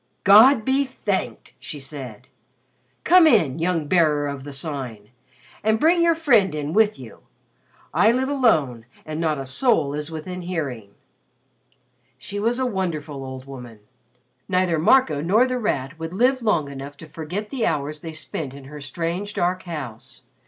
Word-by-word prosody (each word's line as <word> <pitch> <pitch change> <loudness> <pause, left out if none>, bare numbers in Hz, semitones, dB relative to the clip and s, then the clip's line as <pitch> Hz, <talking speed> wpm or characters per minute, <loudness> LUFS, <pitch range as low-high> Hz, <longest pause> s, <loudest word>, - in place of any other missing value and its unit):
"God 220 +4 +7
be 270 +1 +2
thanked!" 215 -7 -4
she 150 - -7
said. 135 -5 -8 0.8
"Come 360 -2 +6
in, 165 - +3
young 165 -2 0
Bearer 155 -4 +3
of 140 -1 -5
the 145 - -7
Sign, 135 -8 -6 0.5
and 220 +1 +2
bring 340 +4 +4
your 335 -1 +4
friend 230 - +3
in 150 +1 -3
with 215 0 +3
you. 125 -4 -12 0.7
I 220 - +5
live 260 +2 0
alone 155 - +1 0.2
and 155 +1 -4
not 155 -2 0
a 135 - -5
soul 150 - +1
is 150 +1 -4
within 175 +3 -6
hearing." 140 - -5 1.2
She 200 +10 -6
was 230 +3 0
a 260 - 0
wonderful 160 - -3
old 130 0 -8
woman. 125 -5 -10 0.7
Neither 180 -3 +1
Marco 160 - +3
nor 205 +10 +3
The 255 -1 -2
Rat 150 - -2
would 160 +1 -5
live 255 +4 +2
long 175 -10 +1
enough 140 +1 -8
to 160 - -11
forget 170 +7 -6
the 265 -5 0
hours 150 0 -2
they 160 +1 -8
spent 155 -3 -6
in 140 - -11
her 145 +2 -10
strange 170 +8 -4
dark 180 +1 0
house. 130 -5 -8
160 Hz, 160 wpm, -23 LUFS, 140-215 Hz, 1.2 s, God